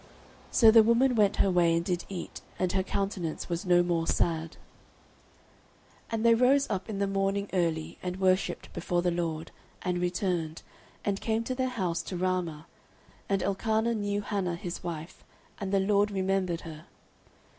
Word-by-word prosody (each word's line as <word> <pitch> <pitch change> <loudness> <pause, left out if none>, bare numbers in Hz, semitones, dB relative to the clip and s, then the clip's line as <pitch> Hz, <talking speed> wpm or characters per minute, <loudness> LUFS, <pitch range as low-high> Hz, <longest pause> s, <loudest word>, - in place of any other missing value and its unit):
So 225 -2 +6
the 225 0 +8
woman 235 +4 +4
went 210 -4 +3
her 195 - +2
way, 170 -2 +3
and 170 0 -1
did 180 -2 -1
eat, 185 -3 -6 0.2
and 185 -1 0
her 190 - +1
countenance 190 -4 -3
was 175 +2 -3
no 175 0 +5
more 170 -2 0
sad. 165 -1 0 1.5
09:001:019 - - -9
And 225 0 0
they 230 - +7
rose 260 +4 +4
up 195 +1 -3
in 210 - -3
the 200 - +1
morning 195 +1 0
early, 165 -4 -1
and 180 +1 -4
worshipped 185 0 0
before 175 0 -1
the 175 - +2
LORD, 165 -2 -3 0.3
and 180 -1 -1
returned, 175 -3 -1 0.4
and 200 -1 -1
came 225 0 0
to 255 - -3
their 255 0 -1
house 185 -9 -1
to 185 - -5
Ramah: 175 -4 -1 0.6
and 195 -1 +1
Elkanah 220 +4 +1
knew 205 -2 -1
Hannah 190 -4 -1
his 175 0 -6
wife; 170 -1 -6 0.4
and 195 -2 -3
the 200 - +3
LORD 205 +1 +3
remembered 190 -3 0
her. 155 -2 -10
185 Hz, 170 wpm, -29 LUFS, 175-205 Hz, 1.5 s, the